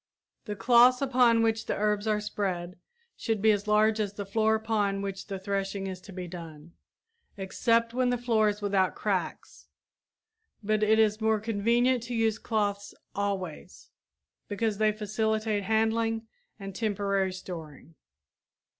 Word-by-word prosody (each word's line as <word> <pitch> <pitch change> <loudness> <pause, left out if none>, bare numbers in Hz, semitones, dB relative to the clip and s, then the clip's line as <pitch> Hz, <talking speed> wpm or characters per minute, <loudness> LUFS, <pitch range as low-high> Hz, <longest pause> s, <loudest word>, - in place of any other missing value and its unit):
The 210 -2 -4
cloths 245 +3 +5
upon 250 -4 +3
which 225 0 0
the - - -1
herbs 210 0 0
are 210 -1 +2
spread 185 -4 -4 0.4
should 225 -2 -2
be 220 +2 +4
as 205 0 -1
large 215 +1 +3
as 205 -2 -1
the 205 0 -6
floor 220 +2 +2
upon 210 -3 -1
which 195 -1 -5
the 195 -1 -4
threshing 195 0 -3
is 185 -1 -6
to 195 - -12
be 180 -1 -6
done 165 -2 -10 0.7
except 230 +4 +1
when 255 0 +1
the 245 - +1
floor 225 -3 +2
is 205 0 -5
without 195 -2 +1
cracks, - - -3 1.0
but 215 +1 +1
it 215 +1 +4
is 215 0 +2
more 220 0 +2
convenient 230 +4 +1
to 240 +1 -5
use 220 -1 +1
cloths 205 -2 -2 0.2
always, 190 -4 -4 0.6
because 215 0 -2
they 215 0 +4
facilitate 215 0 -1
handling 225 +1 +1 0.3
and 195 -1 -7
temporary 200 -2 0
storing. 165 -5 -9
210 Hz, 145 wpm, -28 LUFS, 195-225 Hz, 1.0 s, cloths